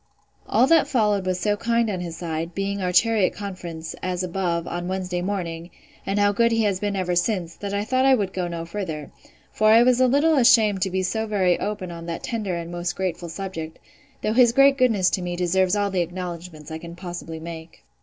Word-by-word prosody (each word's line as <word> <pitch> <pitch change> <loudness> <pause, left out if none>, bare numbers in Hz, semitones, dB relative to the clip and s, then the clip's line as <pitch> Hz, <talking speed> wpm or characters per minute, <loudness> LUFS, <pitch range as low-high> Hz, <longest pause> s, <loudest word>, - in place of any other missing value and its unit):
All 250 - +4
that 330 +3 +4
followed 210 -6 +1
was 185 -1 0
so 205 +1 +1
kind 230 +1 +1
on 195 -4 -2
his 170 -2 -6
side, 165 0 -4
being 195 0 -2
our 180 -1 0
chariot 210 +1 +3
conference, 175 -5 -6
as 185 0 -2
above, 175 -2 -2
on 175 0 -4
Wednesday 185 -1 -2
morning, 175 -3 -4 0.4
and 195 +1 0
how 205 0 +4
good 235 +3 +2
he 225 -1 +2
has 200 -3 0
been 205 0 -2
ever 180 -2 -1
since, 175 -2 0
that 200 -1 -5
I 200 0 -1
thought 255 +3 +1
I 265 - +6
would 200 -5 -2
go 180 -2 -2
no 170 -1 -5
further; 165 -5 -5 0.4
for 215 - +1
I 225 +2 +7
was 250 0 +3
a 255 - +5
little 290 +4 +3
ashamed 225 -6 +5
to 190 - +1
be 190 0 -1
so 220 +4 -1
very 185 -4 +2
open 205 -4 -4
on 170 0 -8
that 170 - -5
tender 210 -6 -2
and 170 0 -5
most 175 0 -3
grateful 180 -2 -3
subject; 165 -3 -6 0.5
though 215 - +1
his 240 -1 +5
great 275 +1 +6
goodness 225 -9 +3
to 185 - -1
me 175 0 -3
deserves 180 +2 +1
all 205 -1 0
the 185 -2 +1
acknowledgments 175 -3 -6
I 160 - -5
can 170 0 -9
possibly 175 -2 -7
make. 165 0 -9
185 Hz, 220 wpm, -23 LUFS, 175-210 Hz, 0.5 s, I